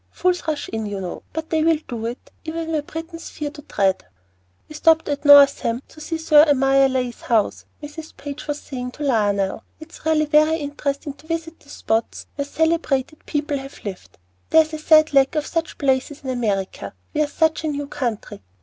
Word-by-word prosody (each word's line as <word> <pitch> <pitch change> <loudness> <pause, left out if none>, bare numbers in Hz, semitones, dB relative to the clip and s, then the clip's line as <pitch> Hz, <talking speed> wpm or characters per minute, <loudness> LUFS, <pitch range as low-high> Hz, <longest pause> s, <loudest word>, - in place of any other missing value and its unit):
Fools 360 -2 -1
rush 305 -2 -2
in, 220 -1 -3
you 205 -1 -4
know; 180 -2 -6 0.3
they 315 -1 +1
will 325 0 +4
do 230 -2 -4
it, 240 +2 -8
even 325 0 -4
where 310 -2 0
Britons 325 +2 -8
fear 295 -2 -5
to 295 - -11
tread." 195 -8 0 0.6
"We - - -11
stopped 320 +1 +3
at 290 0 -3
Northam 280 -4 +6
to 310 - -14
see 325 +2 -3
Sir 305 -2 +6
Amyas 270 -2 +4
Leigh's 250 -2 -2
house," 225 -4 0 0.2
Mrs. 310 +2 -9
Page 285 +1 -7
was 295 0 -2
saying 250 -2 -6
to 300 - -7
Lionel. 205 -7 +1 0.2
"It's 315 0 -13
really 310 -1 +2
very 305 +1 +4
interesting 285 -1 -3
to 295 +2 -20
visit 330 0 -4
the 285 - -21
spots 225 -4 -2
where 280 - -3
celebrated 310 -2 -1
people 295 -1 -1
have 270 -3 -11
lived. 195 -3 -8 0.3
There 320 0 +7
is 315 0 -13
a 310 - -4
sad 310 0 +5
lack 270 +2 +4
of 300 -1 0
such 330 -1 -3
places 275 +1 0
in 260 - -3
America. 195 - -2 0.2
We 305 - +1
are 300 - +2
such 320 +1 +1
a - - -1
new 290 -1 -2
country. 235 - -4
290 Hz, 195 wpm, -22 LUFS, 255-315 Hz, 0.6 s, There